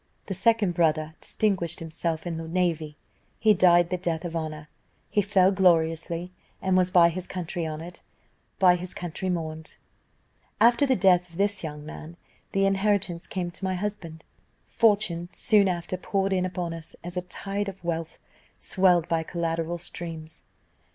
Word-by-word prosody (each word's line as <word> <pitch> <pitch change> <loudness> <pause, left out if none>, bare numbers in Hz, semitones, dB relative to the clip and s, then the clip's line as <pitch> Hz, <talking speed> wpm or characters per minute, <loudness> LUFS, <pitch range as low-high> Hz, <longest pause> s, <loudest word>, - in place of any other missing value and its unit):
"The 195 - -4
second 205 -1 +2
brother 155 -2 +1
distinguished 185 -6 -1
himself 165 0 -3
in 170 -2 -3
the 165 0 -6
navy; 165 -3 -1 0.4
he 215 -1 +5
died 175 -2 +4
the 180 - +1
death 170 -1 -2
of 170 -1 -5
honour; 155 -2 -4 0.4
he 205 - +3
fell 195 -1 +4
gloriously, 170 -2 +2 0.3
and 190 -1 +1
was 185 0 +3
by 175 -2 +6
his 180 +2 -3
country 175 -2 -4
honoured 160 +3 -7 0.6
by 180 -2 +5
his 180 +1 -6
country 180 +2 -4
mourned. 160 -3 -4 0.8
"After 240 +4 +5
the 260 - +3
death 180 -2 +4
of 165 - -13
this 200 -1 +1
young 150 -2 -6
man, 160 +2 -9 0.3
the 195 0 +2
inheritance 195 -3 0
came 180 -2 -3
to 185 - -11
my 190 0 0
husband. 180 -5 -5 0.5
Fortune 200 -6 +2
soon 210 -4 +3
after 180 +1 -3
poured 195 +1 -1
in 185 -1 +1
upon 180 -2 -4
us 165 -1 -8
a 175 +1 -3
tide 195 +2 -4
of 190 -2 -11
wealth, 165 -1 -3 0.4
swelled 180 -4 +3
by 165 -1 +1
collateral 165 0 -2
streams. 165 -2 -6
175 Hz, 160 wpm, -26 LUFS, 165-190 Hz, 0.8 s, by